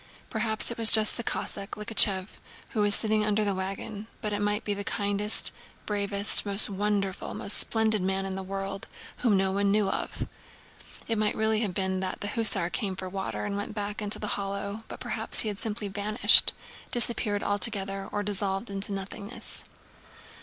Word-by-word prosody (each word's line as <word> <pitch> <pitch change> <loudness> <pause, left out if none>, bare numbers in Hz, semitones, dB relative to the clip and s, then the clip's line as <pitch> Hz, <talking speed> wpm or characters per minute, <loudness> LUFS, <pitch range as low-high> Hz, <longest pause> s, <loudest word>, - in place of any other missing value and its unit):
Perhaps 220 0 -2
it 235 - -8
was 225 -1 +10
just 215 -1 +7
the 235 - -5
Cossack, 200 -2 -5
Likhachëv, 210 -2 +4 0.3
who 215 - -3
was 205 0 +4
sitting 215 -1 +1
under 210 0 0
the 200 - -1
wagon, 195 +3 -7
but 210 -3 -4
it 205 - -3
might 205 +1 -1
be 205 - -1
the 200 0 -6
kindest, 205 0 0 0.3
bravest, 200 0 +2
most 200 0 +4
wonderful, 200 -1 -3
most 200 - +2
splendid 220 -2 +1
man 190 +1 -2
in 190 - -5
the 190 - -5
world, 195 +1 -7 0.3
whom 225 -5 +1
no 190 0 0
one 200 +1 -1
knew 205 0 +1
of. - - -5 0.8
It 225 -2 -2
might 215 -1 0
really 220 0 0
have 205 -6 -4
been 190 -1 -2
that 185 0 -6
the 205 - -4
hussar 205 -6 0
came 190 +4 -4
for 185 0 -7
water 190 +1 -5
and 205 -1 -4
went 205 +1 -6
back 205 0 -5
into 210 0 +1
the - - -7
hollow, 200 +2 -6
but - - -10
perhaps - - -1
he 220 - -2
had 205 -1 -7
simply 210 -1 -4
vanished—disappeared 210 +1 +4
altogether 195 -1 -2
and 205 0 -4
dissolved 200 +1 -3
into 195 +1 -2
nothingness. 200 +3 -5
205 Hz, 180 wpm, -26 LUFS, 195-215 Hz, 0.8 s, was